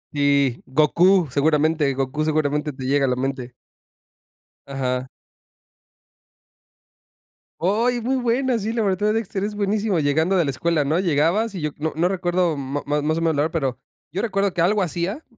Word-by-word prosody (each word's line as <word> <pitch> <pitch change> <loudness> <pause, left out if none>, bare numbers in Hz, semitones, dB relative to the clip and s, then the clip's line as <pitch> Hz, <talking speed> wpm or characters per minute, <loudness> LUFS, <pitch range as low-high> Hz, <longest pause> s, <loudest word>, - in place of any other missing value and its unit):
Sí, 140 -3 +2
Gokú, 170 +5 +3
seguramente. 150 0 +2
Gokú, 135 +3 -2
seguramente 150 -1 0
te 130 -1 -9
llega 140 +1 +2
a - - 0
la 125 - +1
mente. 130 -1 -4 1.1
Ajá. 130 -2 -2 2.5
Oy, 230 +8 +1
muy 255 +4 0
buena, 250 +1 +1
sí, 220 +3 -3
la 230 - 0
verdad 190 -2 0
la 210 - +2
de 215 - +2
Dexter 205 -3 -2
es 210 0 -3
buenísimo, 205 -2 0
llegando 160 +6 +1
de 175 - +3
la 140 - -1
escuela, 155 +3 0
¿no?, 155 +5 0
llegabas 180 +6 +1
y 180 - -5
yo 150 - -1
no 155 +1 -3
no 170 +2 +2
recuerdo 175 -3 0
ma 140 +1 -4
más 150 +2 0
o - - -1
menos 165 -2 +1
la 145 - +2
hora, 155 - -1
pero 135 -7 -2 0.3
yo 185 +6 -2
recuerdo 200 -4 0
que 175 - -1
algo 200 +4 +2
hacía, 180 - -2
160 Hz, 175 wpm, -22 LUFS, 145-195 Hz, 2.5 s, Gokú